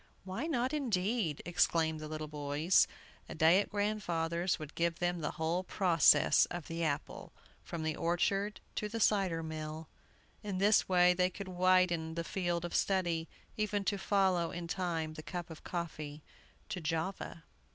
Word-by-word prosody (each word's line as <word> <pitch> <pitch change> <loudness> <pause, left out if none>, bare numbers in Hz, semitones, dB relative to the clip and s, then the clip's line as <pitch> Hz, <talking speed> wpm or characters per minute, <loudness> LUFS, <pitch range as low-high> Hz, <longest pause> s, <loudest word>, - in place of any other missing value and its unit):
"Why 195 +11 -4
not 260 -3 0
indeed?" 215 - 0
exclaimed 165 -2 +2
the 155 - -6
little 155 0 -5
boys. 150 +4 +2 0.4
A - - -6
day 165 +4 +5
at 205 - -1
grandfather's 180 -5 -1
would 155 -1 -8
give 170 0 0
them 175 0 -1
the 150 - -1
whole 170 +3 -1
process 175 -5 +4
of 175 -3 -6
the 165 0 -3
apple, 145 -3 -3 0.3
from 170 -2 -6
the 155 -1 -1
orchard 195 +5 0 0.2
to 210 - -1
the 230 +2 -4
cider 195 -6 +2
mill. 155 0 -6 0.5
In 205 -3 -4
this 205 +2 +4
way 180 -1 +5
they 180 0 +2
could 190 +1 -8
widen 180 -3 +2
the 170 - -2
field 175 -1 -2
of 175 - -6
study, 175 -4 0 0.3
even 210 -1 0
to 200 +1 -1
follow 190 -4 +2
in 175 -1 -6
time 165 -3 -2
the 155 - -8
cup 175 +1 -6
of 160 - -10
coffee 155 -4 -5 0.5
to 190 -4 -4
Java. 165 +1 -3
175 Hz, 160 wpm, -33 LUFS, 160-190 Hz, 0.5 s, day